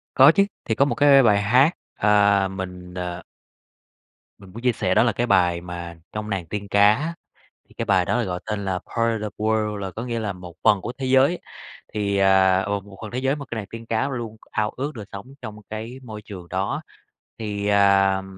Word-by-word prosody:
Có 135 +4 +8
chứ, 200 +2 +4 0.2
thì 110 - 0
có 135 - +4
một 140 - -1
cái 140 -1 +6
bài 105 -4 +4
hát, 125 +8 +5 0.2
à, 100 -1 +3
mình, 90 -1 -7
ờ 90 -1 -5 1.2
Mình 95 -2 -15
muốn 115 +4 -9
chia 125 -1 +3
sẻ 95 -4 0
đó - - +5
là 115 -1 +2
cái 120 +3 -1
bài 90 -5 +3
mà 85 -1 -7 0.2
trong 105 0 -5
Nàng 95 -4 -2
Tiên 100 +1 -5
Cá 100 +1 +5
á, 155 +7 -3 0.5
thì - - -21
cái - - -3
bài 95 -2 +3
đó 105 +6 0
được - - -3
gọi 90 -1 -3
tên 105 -2 -3
là 95 -1 -1
"Part 115 +2 -1
of 105 - -3
World" 110 -1 0
là 95 -1 -4
có 110 - -6
nghĩa 120 -2 -3
là 105 -3 -2
một 90 -2 -11
phần 105 -3 +5
của 120 +6 -5
thế 135 - -3
giới, 135 +6 +4 0.6
thì, 100 -1 0
à, 95 -1 +4
một 100 -1 -4
phần 110 - -6
thế 125 - -4
giới 135 +2 0
mà 140 - -7
cái 120 - -4
Nàng 105 - -5
Tiên 115 0 -9
Cá 115 +4 0
luôn 120 -5 -5
ao 105 0 0
ước 140 +3 -5
được 110 - -7
sống 100 +4 -8 0.2
trong 110 -3 -7
cái 110 +4 -6
môi 110 -4 -9
trường 95 -5 -10
đó. - - -2 0.6
Thì, 105 -2 -3
à, 100 -1 +4
105 Hz, 220 wpm, -23 LUFS, 95-115 Hz, 1.2 s, Có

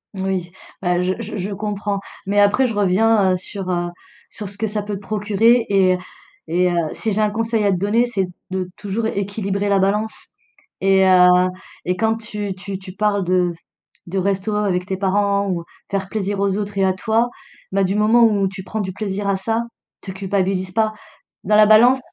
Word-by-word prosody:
Oui, 190 -2 -2 0.3
bah 180 -1 +1
je 185 +1 +1
je 215 -1 -6
je 195 +2 -3
comprends, 205 0 -3 0.3
mais 205 +1 +2
après 205 +6 +4
je 225 - -3
reviens, 205 0 +3
heu, - - +2
sur, 190 0 -5
heu, 175 -1 0 0.4
sur 210 -3 -7
ce 200 +1 -8
que 220 - 0
ça 210 0 -3
peut 205 0 -5
te 195 - -6
procurer 215 +3 +2
et 185 -2 +4 0.5
et 180 +2 +2
heu, - - -1 0.2
si 220 - -3
j'ai 215 - +1
un 210 -1 +2
conseil 225 0 0
à 200 - +3
te 185 - +1
donner, 210 +6 +2
c'est 195 -6 -1 0.2
de 185 -1 -2
toujours 210 +2 -2
équilibrer 200 -1 -2
la 200 -1 +3
balance 210 +3 -1 0.5
et 190 0 +4
heu, 180 0 +6 0.4
et 180 +1 0
quand 225 0 +1
tu 210 -3 -5
tu 190 +1 -6
tu 185 -1 -11
parles 205 -1 +1
de 180 -1 +1 0.5
de 185 +3 -4
resto 200 +2 -1
avec 185 -4 0
tes 190 -1 -3
parents 200 0 +1
ou 170 -2 -2 0.3
faire 195 -1 -2
plaisir 205 -2 -2
aux 195 -1 +1
autres 205 -1 -4
et 195 - +2
à 190 - +2
toi, 225 +4 +1 0.4
bah, 195 +1 +2
du 190 +1 0
moment 220 +3 +4
où 205 -3 +3
tu 190 0 -7
prends 215 +3 -4
du 185 -2 -4
plaisir 200 -1 -3
à 195 - +2
ça, 225 +4 -1 0.4
te 190 - -7
culpabilise 190 -1 -1
pas. 220 0 +1 0.5
Dans 210 +2 +2
la 215 - +7
balance 240 +5 +6
200 Hz, 200 wpm, -20 LUFS, 190-215 Hz, 0.5 s, la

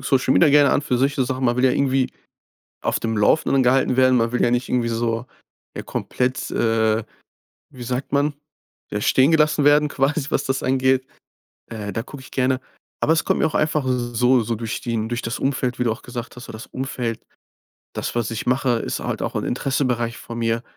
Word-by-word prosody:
Social 130 -1 +2
Media 165 - +5
gerne 145 -1 +5
an - - +2
für 130 -4 -1
solche 135 0 +1
Sachen. 130 +1 -3
Man 120 0 +2
will 125 - +2
ja 130 - +4
irgendwie 135 -1 +1 0.7
auf - - 0
dem 115 -1 -2
Laufenden 135 +5 +3
gehalten 130 0 +3
werden. 130 0 +4
Man 115 0 +1
will 125 - 0
ja 120 - +3
nicht 125 +1 0
irgendwie 120 -2 0
so, 115 +1 -1 0.5
ja, - - -5
komplett, 125 +1 -2
äh, 110 -1 +1 0.7
wie 125 - -11
sagt 125 +3 -4
man, 145 +1 +1 0.6
ja, 105 - -2
stehengelassen 150 +5 +3
werden 150 +1 +5
quasi, 145 +1 -1
was 140 - 0
das 135 0 -1
angeht. 130 0 +2 0.6
Äh, 105 -3 -5
da 115 - -2
gucke 135 +2 -11
ich - - -14
gerne. 130 0 +1 0.4
Aber 160 - +3
es 160 - +1
kommt - - +1
mir - - +3
auch 155 - -4
einfach 150 -2 +1
so 125 0 +2
so 115 +1 -2
durch 115 0 -4
den 115 -2 -2
durch 120 +1 -3
das 115 - -3
Umfeld, 130 -2 -1
wie 125 - 0
du 115 - +2
auch 110 - -9
gesagt 120 -1 -7
hast. 125 - -9
So - - -9
das 110 +3 -9
Umfeld 125 -3 -4 0.7
das, - - -4
was 120 -2 0
ich 115 - -4
mache, 125 -1 +1
ist - - -3
halt - - -3
auch - - -3
'n - - -1
Interessenbereich 125 -3 -1
von 115 - -8
mir. 115 0 0
125 Hz, 210 wpm, -22 LUFS, 115-135 Hz, 0.7 s, Media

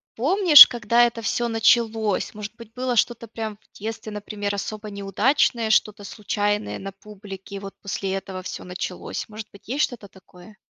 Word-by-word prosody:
помнишь, 320 - +9
когда 235 0 +2
это 235 -1 -3
всё 235 +2 -1
началось, 225 -2 +1
может 210 +1 -8
быть 230 -1 -13
было 250 -1 -2
что-то 235 0 0
прям 220 -1 -6
в - - -21
детстве 220 0 -6
например 205 -1 -4
особо 210 +1 -6
неудачное, 220 +4 0
что-то 210 -1 +1
случайное 205 0 -2
на 195 0 -7
публике, 200 -1 -11
и 195 - -5
вот 195 0 -9
после 195 -1 -3
этого 190 -1 -5
всё 185 - -7
началось, 180 0 -6
может 215 0 -9
быть 200 +1 -18
есть 275 +5 0
что-то 225 -6 -4
такое? 185 +1 -17
210 Hz, 170 wpm, -23 LUFS, 200-230 Hz, -, помнишь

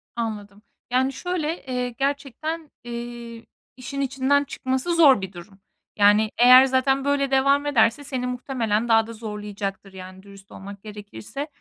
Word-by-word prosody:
Anladım, 210 -3 -5 0.3
yani, 260 +2 +1
şöyle, 340 +1 -3
eee, 250 -1 -2
gerçekten, 285 +5 -4
eee, 235 -1 -8 0.3
işin 275 +2 -5
içinden 275 +1 +1
çıkması 260 +5 -2
zor 280 -10 +6
bir 190 0 -6
durum. 190 +3 -13 0.4
Yani, 210 +1 +4
eğer 255 +2 +8
zaten 270 +1 +1
böyle 280 -1 0
devam 275 +2 +3
ederse 240 -1 +2
seni 260 -3 -3
muhtemelen 240 -3 -2
daha 225 -1 +3
da 230 - -8
zorlayacaktır. 205 -3 -6
Yani, 185 0 -11
dürüst 200 -1 -16
olmak 200 0 -10
gerekirse 210 - -8
245 Hz, 140 wpm, -23 LUFS, 210-275 Hz, 0.4 s, eğer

